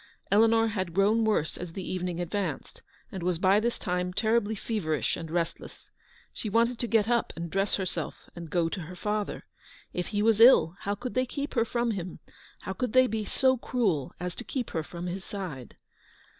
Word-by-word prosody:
Eleanor 225 Hz, +2 st, +5 dB
had 185 Hz, -5 st, -3 dB
grown 210 Hz, +4 st, +4 dB
worse 210 Hz, -8 st, +1 dB
as 175 Hz, -2 st, -7 dB
the 190 Hz, 0 st, -5 dB
evening 180 Hz, -2 st, -2 dB
advanced, 175 Hz, -3 st, -3 dB, 0.3 s
and 190 Hz, -, -5 dB
was 175 Hz, 0 st, 0 dB
by 190 Hz, +4 st, +4 dB
this 235 Hz, +2 st, -1 dB
time 180 Hz, 0 st, -1 dB
terribly 220 Hz, +2 st, +1 dB
feverish 190 Hz, -8 st, -1 dB
and 165 Hz, -, -6 dB
restless. 170 Hz, 0 st, -4 dB, 0.4 s
She 215 Hz, -, -4 dB
wanted 230 Hz, +3 st, +2 dB
to 240 Hz, -, -1 dB
get 220 Hz, -2 st, +3 dB
up 235 Hz, -1 st, +1 dB
and 170 Hz, -1 st, -5 dB
dress 195 Hz, +1 st, +1 dB
herself, 190 Hz, -2 st, -4 dB
and 170 Hz, -2 st, -7 dB
go 170 Hz, 0 st, +2 dB
to 180 Hz, +3 st, -4 dB
her 175 Hz, +3 st, -8 dB
father. 210 Hz, +2 st, -2 dB, 0.5 s
If 180 Hz, -, -2 dB
he 205 Hz, -1 st, 0 dB
was 225 Hz, 0 st, +4 dB
ill, 230 Hz, -8 st, +7 dB
how 200 Hz, +1 st, -2 dB
could 245 Hz, +4 st, -5 dB
they 255 Hz, 0 st, +1 dB
keep 285 Hz, +3 st, -4 dB
her 230 Hz, -3 st, +2 dB
from 235 Hz, 0 st, 0 dB
him, 185 Hz, -4 st, -5 dB, 0.4 s
how 190 Hz, -, -4 dB
could 250 Hz, +3 st, -2 dB
they 255 Hz, 0 st, +7 dB
be 220 Hz, -3 st, -2 dB
so 260 Hz, +4 st, +2 dB
cruel 200 Hz, -, 0 dB
as 180 Hz, 0 st, -3 dB
to 245 Hz, -, -6 dB
keep 250 Hz, -1 st, -4 dB
her 160 Hz, -, -1 dB
from 170 Hz, +2 st, -7 dB
his 180 Hz, +2 st, -4 dB
side 175 Hz, -, -7 dB
200 Hz, 200 wpm, -28 LUFS, 175-225 Hz, 0.5 s, ill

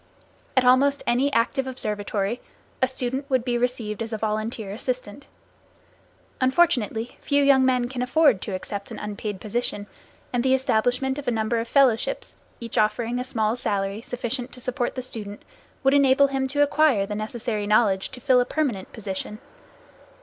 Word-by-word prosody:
At 255 Hz, -, +5 dB
almost 275 Hz, +3 st, +4 dB
any 250 Hz, +4 st, +2 dB
active 265 Hz, +2 st, +1 dB
observatory 210 Hz, -2 st, -2 dB, 0.4 s
a 260 Hz, -, +4 dB
student 260 Hz, +2 st, -3 dB
would 260 Hz, -3 st, +1 dB
be 245 Hz, -2 st, 0 dB
received 240 Hz, -3 st, -1 dB
as 225 Hz, 0 st, -3 dB
a 220 Hz, -, -2 dB
volunteer 215 Hz, -1 st, -3 dB
assistant. 250 Hz, +2 st, -4 dB, 1.1 s
Unfortunately, 255 Hz, -, +2 dB
few 285 Hz, 0 st, +2 dB
young 275 Hz, -1 st, +5 dB
men 250 Hz, -2 st, +2 dB
can 250 Hz, 0 st, -5 dB
afford 250 Hz, -, +3 dB
to 195 Hz, -, -4 dB
accept 200 Hz, +2 st, -6 dB
an -, -, -7 dB
unpaid 210 Hz, -1 st, -5 dB
position, 215 Hz, -1 st, -3 dB, 0.5 s
and 240 Hz, -1 st, +1 dB
the 260 Hz, 0 st, +4 dB
establishment 265 Hz, +2 st, +1 dB
of 285 Hz, -, -9 dB
a 240 Hz, -2 st, +1 dB
number 220 Hz, +1 st, 0 dB
of 230 Hz, -, -3 dB
fellowships 250 Hz, -3 st, +2 dB, 0.2 s
each 230 Hz, -2 st, -2 dB
offering 230 Hz, +3 st, +1 dB
a -, -, -1 dB
small 225 Hz, -4 st, 0 dB
salary 200 Hz, -3 st, -2 dB
sufficient 245 Hz, +1 st, -3 dB
to -, -, -10 dB
support 250 Hz, 0 st, -1 dB
the 255 Hz, -, -3 dB
student 210 Hz, -5 st, -7 dB, 0.4 s
would 270 Hz, 0 st, +4 dB
enable 280 Hz, 0 st, +5 dB
him 270 Hz, -1 st, -1 dB
to 290 Hz, +2 st, +2 dB
acquire 290 Hz, -8 st, +3 dB
the 210 Hz, -, -5 dB
necessary 215 Hz, 0 st, -3 dB
knowledge 205 Hz, -3 st, +3 dB
to 260 Hz, -, -9 dB
fill 255 Hz, 0 st, +4 dB
a -, -, 0 dB
permanent 250 Hz, -12 st, -2 dB
position. 210 Hz, -1 st, -5 dB
245 Hz, 165 wpm, -24 LUFS, 215-265 Hz, 1.1 s, At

